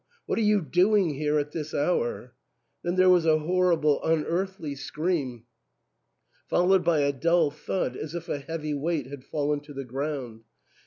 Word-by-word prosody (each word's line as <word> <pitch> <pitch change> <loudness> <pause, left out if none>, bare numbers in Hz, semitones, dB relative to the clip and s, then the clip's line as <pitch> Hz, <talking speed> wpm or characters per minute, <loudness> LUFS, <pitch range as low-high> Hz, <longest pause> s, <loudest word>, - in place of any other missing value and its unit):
what - - -1
are - - +1
you 210 -3 +3
doing 180 +4 +3
here 150 +1 0
at 150 0 -1
this 155 -1 -5
hour? 125 -5 -1 0.3
" 120 -2 -50
Then 175 +1 -1
there 185 0 +5
was 180 -3 +5
a 155 -1 +5
horrible 165 -2 +2
unearthly 165 +1 -1
scream, 140 -4 -3 1.0
followed 185 +1 +3
by 165 -3 +3
a 140 0 +2
dull 165 +2 +2
thud 180 +5 -3
as 155 +2 -6
if 170 -1 -5
a 145 - -2
heavy 150 +1 -4
weight 150 0 -1
had 135 0 -9
fallen 145 +1 -1
to 145 0 -13
the 135 0 -5
ground. 130 -3 -4
155 Hz, 170 wpm, -27 LUFS, 145-175 Hz, 1.0 s, there